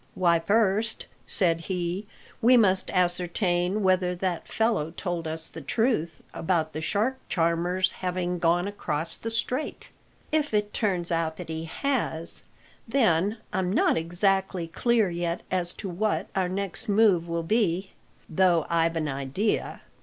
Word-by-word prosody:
"Why, 170 -2 +3
first," 215 +3 +1 0.2
said 170 -4 +2
he, 180 +2 -3 0.3
"we 245 +2 +6
must 190 -4 +3
ascertain 180 +2 +1
whether 185 -1 +2
that 180 -2 -2
fellow 220 -9 0
told 170 -1 -4
us 160 0 -4
the 165 - -9
truth 170 - 0
about 160 -2 0
the 155 - -4
shark 220 +10 0
charmer's 175 +2 +1
having 180 -1 -2
gone 175 +2 +2
across 165 -5 -2
the 225 - -5
Strait. 250 +5 -2 0.4
If 300 -6 +1
it 210 0 0
turns 185 -6 0
out 165 -1 0
that - - -8
he 160 0 -4
has, 170 - -1 0.4
then 215 -4 +2 0.2
I'm 185 -1 0
not - - +3
exactly 185 +2 0
clear 220 +3 +1
yet 170 0 -2
as 180 -2 +1
to - - -6
what 200 +4 -1
our 185 -2 +1
next 200 +3 -3
move 200 -5 +4
will 170 0 -2
be, 190 -1 +1 0.4
though 170 -1 +3
I've 165 0 +2
an 155 -2 -1
idea. 140 +10 -2
180 Hz, 145 wpm, -26 LUFS, 165-205 Hz, 0.4 s, we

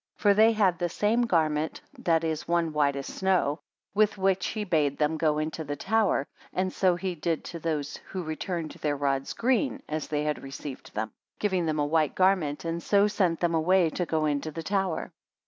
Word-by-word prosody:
For 205 -1 +4
they 220 +3 +5
had 195 -6 +2
the 175 - 0
same 225 +7 +1
garment, 155 -4 +1 0.2
that 165 -1 +2
is, 160 -2 -2
one 170 -2 +1
white 145 -2 +2
as 140 -1 -4
snow; 185 -6 0 0.3
with 210 0 +3
which 190 -1 +1
he 215 - -3
bade 155 -7 +1
them 150 +1 +1
go 155 -1 +1
into 155 +1 -2
the 145 -1 -4
tower 195 -4 +1 0.3
And 185 0 -1
so 185 -2 +3
he 185 +1 -3
did 165 -1 -2
to 170 - -7
those 150 -3 -2
who 185 -2 -4
returned 160 +1 -3
their 145 -1 -2
rods 135 -1 -1
green 265 +3 0
as 155 0 -3
they 150 -1 -1
had 150 0 -1
received 135 -2 -8
them; 110 +1 -2 0.3
giving 185 -5 0
them 155 -1 0
a 145 - +1
white 155 0 +1
garment, 185 -6 +2
and 165 +1 -2
so 200 +3 +4
sent 190 -6 0
them 170 -1 +2
away 165 +1 +3
to 175 +1 -2
go 155 -1 +1
into 145 +1 -1
the 165 +2 -6
tower. 190 -2 -1
165 Hz, 200 wpm, -27 LUFS, 150-190 Hz, 0.3 s, they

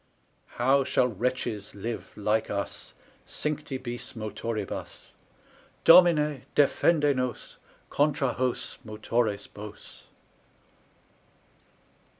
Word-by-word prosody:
How 135 +3 +4
shall 130 - +2
wretches 115 -2 -3
live 115 +3 -5
like 105 +1 0
us 100 -1 -5 0.3
Cincti 150 -2 -3
Bis 120 -1 -7
Motoribus? 110 -1 -5 0.7
Domine, 150 -5 +6
defende 145 0 +3
nos 125 -1 -4 0.3
Contra 145 -3 +2
hos 125 -1 -2
Motores 110 -1 -1
Bos! 105 0 -11
125 Hz, 80 wpm, -27 LUFS, 110-140 Hz, 0.7 s, Domine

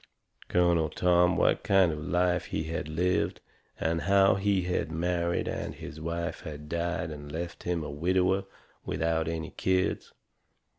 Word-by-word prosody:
Colonel 85 -3 +3
Tom 90 +2 +3
what - - +3
kind 95 -3 +4
of 75 - -4
a - - -7
life 90 +2 +1
he 80 - -2
had 80 -1 -4
lived, 90 +4 0 0.4
and 80 +1 0
how 100 0 +5
he 95 -1 +1
had 90 -2 -1
married 85 +1 0
and - - -4
his 75 - -9
wife 85 +1 -3
had 75 -1 -8
died 85 0 -2
and 75 -1 -8
left 85 +2 -5
him 85 -2 -1
a 75 - -5
widower 95 +5 +1 0.4
without 80 0 0
any 80 -1 -3
kids. 95 0 0
85 Hz, 155 wpm, -29 LUFS, 80-90 Hz, 0.4 s, how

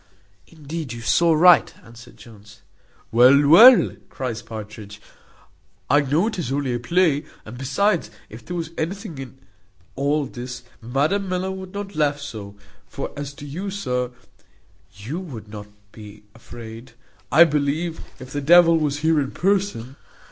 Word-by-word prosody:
"Indeed, 155 -3 -7
you 120 - -8
saw 170 +8 +3
right," 175 +3 +6
answered 115 +1 -15
Jones. 105 -3 -16 0.5
"Well, 130 +5 +5
well," 230 - +8
cries 125 -4 -5
Partridge, 105 -2 -10 0.9
"I 145 - +6
know 150 +7 +1
it 220 -4 -3
is 140 -7 -3
only 140 -2 -1
a 120 - -2
play: 160 +1 +1 0.2
and 110 - -9
besides, 140 - 0 0.2
if 110 +2 -12
there 180 - -6
was 165 -2 -4
anything 175 -1 -5
in 130 -1 -9 0.6
all 145 +2 0
this, 125 -1 -8 0.2
Madam 150 - -1
Miller 185 +1 -2
would 190 -1 -8
not 200 -2 -6
laugh 145 -1 0
so; 105 -8 -8 0.3
for - - -6
as 145 0 -6
to 145 - -10
you, 175 +8 -5
sir, 125 -11 -2 0.9
you 115 - -6
would 130 - -9
not 105 -1 -9 0.2
be 105 -1 -13
afraid, 115 0 -11 0.4
I 155 +6 +8
believe, 155 +2 -1 0.2
if 130 0 -11
the 145 - -2
devil 170 +2 +6
was 145 -1 -2
here 160 -1 +2
in 135 -2 -2
person. 185 - -1
145 Hz, 150 wpm, -22 LUFS, 120-170 Hz, 0.9 s, well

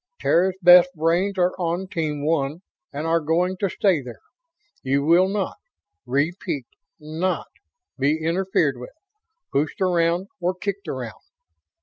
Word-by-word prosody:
Terra's 185 +2 +2
best 180 0 +8
brains 175 +5 +1
are 180 0 +2
on 175 +2 -2
Team 155 -5 -3
One 155 +2 -1 0.3
and 145 +2 -4
are 165 +1 +2
going 170 +4 0
to 195 +1 -1
stay 180 -4 +1
there. 125 -3 -9 0.6
You 140 +1 0
will 175 +4 +5
not 200 -1 -2 0.5
repeat 145 +1 -1 0.3
NOT 160 +5 -2 0.5
be 145 +3 +2
interfered 165 -4 0
with, 125 - -10 0.6
pushed 145 +3 -1
around 175 0 +1
or 180 +1 -1
kicked 200 +1 -4
around. 125 -4 -6
170 Hz, 130 wpm, -23 LUFS, 150-185 Hz, 0.6 s, best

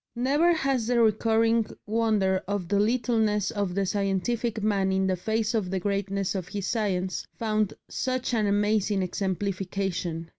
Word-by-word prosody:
Never 285 +8 +3
has 270 -8 0
that 245 -1 +2
recurring 225 0 +3 0.2
wonder 210 -4 +1
of 200 -3 -2
the 200 +2 +1
littleness 220 -2 +1
of 200 -4 -2
the 200 0 +1
scientific 205 +3 -1
man 200 -3 +1
in 190 0 +1
the 190 -1 +1
face 220 +4 -1
of 210 -5 0
the 190 0 -1
greatness 195 0 -1
of 185 -3 -4
his 200 -1 -4
science 190 -4 -1
found 215 -2 0
such 255 -1 -2
an 215 -3 +2
amazing 205 -1 +1
exemplification. 185 -2 -2
205 Hz, 150 wpm, -27 LUFS, 190-225 Hz, 0.2 s, Never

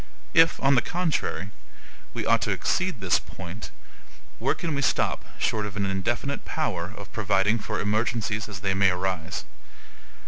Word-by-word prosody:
If, 165 -1 +6
on 135 +1 +6
the 125 - +5
contrary, 165 - -1 0.6
we - - -2
ought - - +4
to - - 0
exceed 185 - 0
this 90 -2 +3
point, 90 +4 -8 0.7
where - - +2
can 165 -3 -2
we 140 - 0
stop, - - +1
short 105 -2 0
of 105 0 -7
an 100 - +1
indefinite 120 +9 -1
power 95 - -2
of 100 - -10
providing 105 +1 +2
for - - -3
emergencies 110 0 0
as 95 -3 -6
they 95 -1 +1
may 95 0 +4
arise? 90 -2 -2
105 Hz, 160 wpm, -26 LUFS, 95-130 Hz, 0.7 s, If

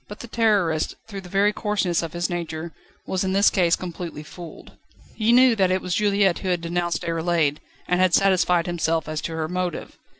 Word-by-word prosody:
But 210 - -9
the 235 - -8
Terrorist, 205 -9 +1
through 200 -3 -7
the 180 - -12
very 200 +3 +2
coarseness 205 -5 0
of 165 -2 -6
his 175 0 -1
nature, 165 -1 -5 0.3
was 190 0 -1
in 190 0 -1
this 200 +1 +4
case 175 -3 +3
completely 170 -3 -7
fooled. 170 +2 -11 0.4
He 225 +1 +1
knew 250 0 +6
that 190 -3 +2
it 185 +1 +1
was 180 -1 -4
Juliette 200 -3 +2
who 190 - -3
had 175 -2 0
denounced 175 0 -2
Déroulède, 165 -3 0 0.3
and 180 - +1
had 185 -2 +4
satisfied 180 -3 +3
himself 165 -2 -1
as 155 0 -3
to 165 - -5
her 160 -1 -2
motive. 180 0 -4
180 Hz, 200 wpm, -23 LUFS, 170-195 Hz, 0.4 s, knew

